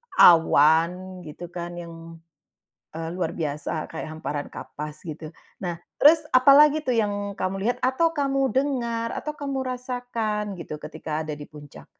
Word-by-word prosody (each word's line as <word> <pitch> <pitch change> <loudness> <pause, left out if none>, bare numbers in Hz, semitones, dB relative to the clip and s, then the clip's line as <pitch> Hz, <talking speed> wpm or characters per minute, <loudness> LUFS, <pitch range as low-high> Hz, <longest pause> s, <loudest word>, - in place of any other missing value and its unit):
awan 170 +3 +5
gitu 170 +3 -8
kan 175 0 -6
yang, 170 -1 -8 1.0
eee, 165 0 -5
luar 175 -3 -1
biasa 155 0 -3
kayak 160 -1 -6
hamparan 145 -2 -3
kapas 150 +1 -8
gitu. 155 0 -6 0.3
Nah, 175 -2 -3 0.2
terus 310 +3 +8 0.2
apa 255 +2 +7
lagi 300 +1 +6
tuh 250 -4 0
yang 205 -2 -1
kamu 185 +1 -1
lihat, 245 +2 +1
atau 295 +6 +2
kamu 275 -3 0
dengar, 235 -4 -1
atau 300 - -3
kamu 275 -2 -3
rasakan 245 -4 -3 0.2
gitu 155 - -6
ketika 155 0 -4
ada 155 - -5
di 145 - -8
puncak? 145 -2 -13
185 Hz, 150 wpm, -25 LUFS, 160-255 Hz, 1.0 s, terus